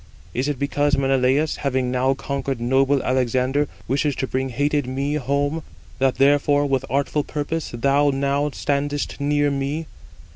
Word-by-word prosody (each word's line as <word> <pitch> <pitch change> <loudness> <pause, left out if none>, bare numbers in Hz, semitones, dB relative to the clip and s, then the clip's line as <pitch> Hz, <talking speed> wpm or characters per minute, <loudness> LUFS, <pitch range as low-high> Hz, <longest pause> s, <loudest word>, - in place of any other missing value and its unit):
Is 130 +3 -1
it 145 -2 -1
because 145 +1 +1
Menelaus, 135 +2 +2
having 130 -3 -1
now 130 +1 +1
conquered 135 -1 -3
noble 135 +3 +2
Alexander, 130 +3 +1 0.2
wishes 140 +1 0
to - - -1
bring 130 +1 -2
hated 145 +2 0
me 135 +3 -2
home, 145 +2 0 0.4
that 135 -1 +2
therefore 145 +1 +3
with 135 -2 0
artful 140 +2 0
purpose 155 +2 -3
thou 140 +4 +2
now 140 +1 0
standest 145 +1 -2
near 145 0 +2
me? 140 +4 -2
140 Hz, 145 wpm, -22 LUFS, 130-145 Hz, 0.4 s, therefore